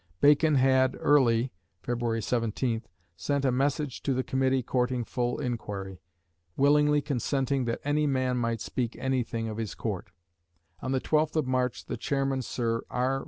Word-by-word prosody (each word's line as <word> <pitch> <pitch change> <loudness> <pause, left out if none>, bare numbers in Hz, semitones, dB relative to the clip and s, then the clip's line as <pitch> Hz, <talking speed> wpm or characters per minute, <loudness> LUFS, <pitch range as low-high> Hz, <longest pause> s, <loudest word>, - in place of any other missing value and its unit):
Bacon 150 +1 +5
had 130 0 +4
early 125 -4 +3 0.3
(Feb. 120 -1 -2
17th) 115 0 -1 0.3
sent 140 - -1
a 130 - +3
message 140 +1 -1
to 135 - 0
the 130 - 0
Committee 130 0 +1
courting 125 0 0
full 120 +1 -2
inquiry, 100 - -4 0.6
"willingly 150 +1 +4
consenting 135 -1 -1
that 115 0 -2
any 150 +1 +1
man 130 -2 +1
might 115 -2 -1
speak 120 -2 -3
anything 125 -3 -1
of 110 -1 -5
his 110 -3 -4
Court." 100 -6 -4 0.7
On 130 - -3
the 130 -1 +1
12th 155 0 +1
of 155 - +2
March 130 -1 -1
the - - -4
chairman, 135 +2 0
Sir 115 -2 -1
R. 130 +2 0
130 Hz, 155 wpm, -28 LUFS, 115-135 Hz, 0.7 s, Bacon